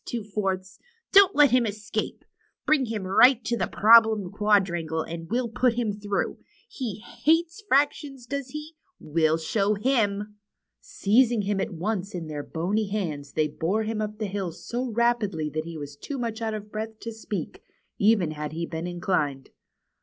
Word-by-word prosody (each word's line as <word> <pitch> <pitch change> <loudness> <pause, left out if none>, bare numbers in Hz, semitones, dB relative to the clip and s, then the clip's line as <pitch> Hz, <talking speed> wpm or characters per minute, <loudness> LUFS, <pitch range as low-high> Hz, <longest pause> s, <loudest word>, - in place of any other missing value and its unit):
Two 235 -3 -4
Fourths. 195 -2 -3 0.3
Don't 395 -1 +7
let 295 -4 +6
him 250 -2 +3
escape. 210 0 -4 0.4
Bring 285 -5 +3
him 220 -3 -3
right 245 +7 +6
up 235 - -31
to 235 0 -1
Problem 220 -3 +5
Quadrangle, 185 -6 +1
and 165 0 -7
we'll 240 +2 0
put 235 +2 +1
him 230 -4 -1
through. 205 -1 -2 0.3
He 225 - -5
Hiates 330 +5 +1
' - - -38
fractions, 275 -2 +1
does 280 +1 -4
he? 300 +3 -7 0.3
We'll 160 +1 +1
show 200 +5 0
him!" 210 -3 0 0.4
Seizing 230 +1 +2
him 200 0 0
at - - -2
once 195 +2 -3
in 170 -2 -4
their 150 -2 -5
bony 190 +8 -1
hands 155 -9 -4
they 155 -1 +1
bore 180 +8 -1
him 215 0 -2
up 210 0 -4
the 215 - -2
hill 195 -3 -3
so 245 +9 -4
rapidly 215 -9 0
that 155 +1 -3
he 165 -1 -7
was 145 -1 -7
too 275 - -6
much 230 -2 -3
out 220 -1 -1
of 210 0 -8
breath 220 +1 -5
to 230 - -5
speak, 210 -5 -6 0.4
even 200 -6 +3
had 150 0 -5
he 170 +1 -3
been 165 +1 -5
inclined. 175 -6 -2
210 Hz, 175 wpm, -26 LUFS, 175-235 Hz, 0.4 s, Don't